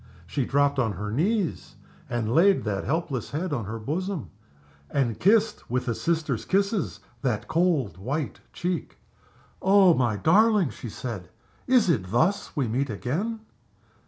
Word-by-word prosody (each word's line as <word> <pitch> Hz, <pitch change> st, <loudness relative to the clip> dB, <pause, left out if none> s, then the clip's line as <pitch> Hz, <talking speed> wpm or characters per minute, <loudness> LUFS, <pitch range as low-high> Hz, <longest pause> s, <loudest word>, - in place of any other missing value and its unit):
She 140 Hz, -4 st, -2 dB
dropped 140 Hz, +1 st, +2 dB
on 115 Hz, -5 st, +1 dB
her 105 Hz, +3 st, -5 dB
knees 185 Hz, -, -1 dB, 0.3 s
and 115 Hz, -2 st, -1 dB
laid 190 Hz, +6 st, +5 dB
that 100 Hz, -3 st, -2 dB
helpless 150 Hz, -6 st, -2 dB
head 160 Hz, +2 st, -3 dB
on 120 Hz, -7 st, -2 dB
her 110 Hz, +3 st, -5 dB
bosom, 155 Hz, -, -3 dB, 0.6 s
and 120 Hz, -6 st, 0 dB
kissed, 215 Hz, +2 st, +2 dB
with 125 Hz, +2 st, -1 dB
a 115 Hz, -, +1 dB
sister's 160 Hz, +5 st, -1 dB
kisses, 200 Hz, 0 st, 0 dB, 0.2 s
that 120 Hz, -6 st, -1 dB
cold, 155 Hz, -, +1 dB
white 125 Hz, -, -3 dB
cheek. 175 Hz, -1 st, -3 dB, 0.6 s
"Oh, 190 Hz, -2 st, +6 dB
my 120 Hz, -7 st, +1 dB
darling!" 200 Hz, -, +4 dB
she 120 Hz, -, -8 dB
said. 105 Hz, -5 st, -6 dB, 0.4 s
"Is 250 Hz, -5 st, +4 dB
it 95 Hz, -, +1 dB
thus 160 Hz, -, +1 dB
we 140 Hz, -5 st, 0 dB
meet 130 Hz, +5 st, -1 dB
again?" 175 Hz, -, -3 dB
145 Hz, 145 wpm, -26 LUFS, 115-185 Hz, 0.6 s, Oh